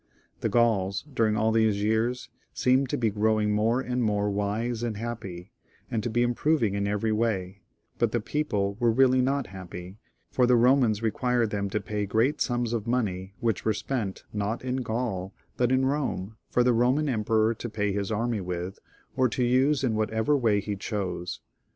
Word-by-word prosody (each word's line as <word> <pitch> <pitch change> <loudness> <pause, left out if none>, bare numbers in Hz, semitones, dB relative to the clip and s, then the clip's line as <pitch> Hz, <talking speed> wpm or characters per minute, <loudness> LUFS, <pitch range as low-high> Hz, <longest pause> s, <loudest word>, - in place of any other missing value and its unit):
The - - -1
Gauls, 105 -5 +2
during 110 -3 +2
aU 110 +1 +2
these 110 -2 +2
years, 115 +4 0 0.3
seemed 130 +1 +2
to - - -1
be 115 -3 +1
growing 105 0 +1
more 110 +4 +2
and 125 -1 -2
more 105 -2 +1
wise 110 +4 -1
and 115 -3 -2
happy, 100 -6 -6 0.4
and 110 - 0
to 120 - -2
be 120 +2 +2
improving 120 -2 +1
in 100 0 -1
every 105 +2 0
way; 100 -4 -1 0.4
but 120 -2 +2
the 120 - +1
people 105 -6 -1
were 120 -2 +3
reaUy 130 +2 +4
not 135 +1 0
happy, 90 0 -8 0.3
for 125 -1 +3
the 125 - +5
Romans 120 -3 +3
expected 120 0 +1
them 100 -1 -2
to 105 - -1
pay 105 -1 -3
great 115 +9 +1
sums 120 -2 0
of 115 -1 -2
money, 100 -6 -1
which 115 -5 0
were 110 -1 +1
spent, 110 -6 -3
not 105 +3 -2
in 130 0 -1
Gaul, 110 -6 -3 0.2
but 125 0 +1
in 130 0 +3
Rome, 130 -8 -2
for 125 - +3
the 125 0 +3
Roman 125 +6 +2
emperor 110 -2 +2
to 120 +1 -6
pay 105 -2 -1
his 100 +1 -2
army, 115 +1 0 0.8
or 130 -1 +3
use 130 +3 +2
in 120 -4 +1
whatever 110 +5 +1
way 110 -6 +2
he 105 0 -3
chose. 95 -3 -4
110 Hz, 180 wpm, -27 LUFS, 105-125 Hz, 0.8 s, the